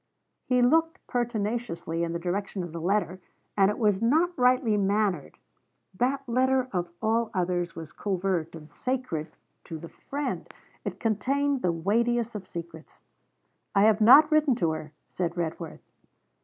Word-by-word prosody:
He 250 Hz, -1 st, +3 dB
looked 325 Hz, +6 st, +3 dB
pertinaciously 220 Hz, -8 st, -2 dB
in 170 Hz, -, -2 dB
the 170 Hz, -, -2 dB
direction 185 Hz, +2 st, -3 dB
of 175 Hz, -, -7 dB
the 165 Hz, 0 st, -6 dB
letter, 185 Hz, 0 st, 0 dB, 0.4 s
and 195 Hz, -1 st, +4 dB
it 210 Hz, -, -2 dB
was 210 Hz, -4 st, +2 dB
not 320 Hz, +9 st, +2 dB
rightly 250 Hz, -3 st, +3 dB
mannered. 200 Hz, -5 st, 0 dB, 0.6 s
That 265 Hz, +7 st, -1 dB
letter, 260 Hz, +1 st, +2 dB
of 175 Hz, -2 st, -2 dB
all 225 Hz, +1 st, +1 dB
others, 175 Hz, -2 st, -1 dB
was 160 Hz, -2 st, -8 dB
covert 185 Hz, -4 st, -2 dB
and 155 Hz, -1 st, -12 dB
sacred 250 Hz, -12 st, -3 dB, 0.4 s
to 165 Hz, -, -6 dB
the 165 Hz, +1 st, -10 dB
friend. 285 Hz, +1 st, -5 dB, 0.3 s
It -, -, -5 dB
contained 270 Hz, +5 st, 0 dB
the 180 Hz, -, +2 dB
weightiest 235 Hz, +7 st, 0 dB
of 200 Hz, -3 st, -7 dB
secrets. 170 Hz, -2 st, -9 dB, 0.7 s
'I 200 Hz, -, +5 dB
have 220 Hz, 0 st, +4 dB
not 290 Hz, +8 st, +8 dB
written 305 Hz, -4 st, +4 dB
to 170 Hz, -9 st, +1 dB
her,' 155 Hz, -1 st, -6 dB, 0.2 s
said 175 Hz, -1 st, -3 dB
Redworth. 165 Hz, -1 st, -5 dB
205 Hz, 150 wpm, -27 LUFS, 175-250 Hz, 0.7 s, not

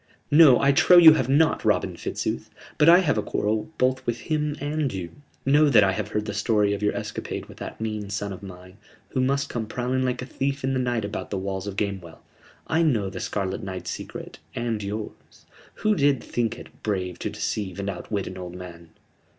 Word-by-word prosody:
"No, 145 Hz, -4 st, +8 dB
I 140 Hz, -, +4 dB
trow 175 Hz, +6 st, +6 dB
you 165 Hz, -3 st, +10 dB
have 130 Hz, -5 st, 0 dB
not, 155 Hz, +4 st, +3 dB
Robin -, -, +1 dB
Fitzooth! -, -, -4 dB, 0.3 s
But 150 Hz, +2 st, +7 dB
I 175 Hz, +2 st, +8 dB
have 145 Hz, -, +1 dB
a -, -, +1 dB
quarrel 105 Hz, +1 st, -1 dB
both 130 Hz, +1 st, +1 dB
with 120 Hz, 0 st, -1 dB
him 150 Hz, -2 st, -1 dB
and 145 Hz, -1 st, -1 dB
you. 90 Hz, -3 st, -5 dB, 0.3 s
Know 145 Hz, +2 st, +5 dB
that 115 Hz, -6 st, +6 dB
I 95 Hz, -, +3 dB
have 95 Hz, -, -3 dB
heard 105 Hz, 0 st, -2 dB
the 105 Hz, -, -4 dB
story 105 Hz, 0 st, +2 dB
of 100 Hz, -, -4 dB
your 105 Hz, -, +1 dB
escapade -, -, -5 dB
with -, -, -14 dB
that -, -, -7 dB
mean 110 Hz, -2 st, -4 dB
son 100 Hz, 0 st, -3 dB
of 95 Hz, -, -10 dB
mine, 90 Hz, -1 st, -11 dB, 0.3 s
who 130 Hz, -, -1 dB
must 140 Hz, +2 st, +1 dB
come 115 Hz, -3 st, -4 dB
prowling 125 Hz, +3 st, -1 dB
like 125 Hz, -1 st, -1 dB
a -, -, -6 dB
thief 135 Hz, +1 st, -3 dB
in 135 Hz, +1 st, 0 dB
the 130 Hz, -, 0 dB
night 120 Hz, -4 st, -1 dB
about 100 Hz, -, -5 dB
the 100 Hz, -, -3 dB
walls 95 Hz, 0 st, -4 dB
of 100 Hz, -, -5 dB
Gamewell. 95 Hz, -5 st, -4 dB, 0.4 s
I 160 Hz, +1 st, +1 dB
know 115 Hz, -, +1 dB
the 95 Hz, -, -6 dB
Scarlet 95 Hz, -1 st, -3 dB
Knight's 95 Hz, -1 st, -5 dB
secret, -, -, -8 dB, 0.2 s
and 115 Hz, -2 st, -2 dB
yours 105 Hz, +2 st, -7 dB, 0.3 s
who 215 Hz, -, +1 dB
did 140 Hz, -5 st, +2 dB
think 120 Hz, -2 st, -2 dB
it -, -, -14 dB
brave 95 Hz, -4 st, -2 dB
to -, -, -2 dB
deceive 100 Hz, -4 st, -3 dB
and 100 Hz, -, -3 dB
outwit 100 Hz, +1 st, -3 dB
an 95 Hz, -, -7 dB
old 90 Hz, -1 st, -7 dB
man." 85 Hz, -2 st, -10 dB
110 Hz, 215 wpm, -25 LUFS, 100-135 Hz, 0.4 s, you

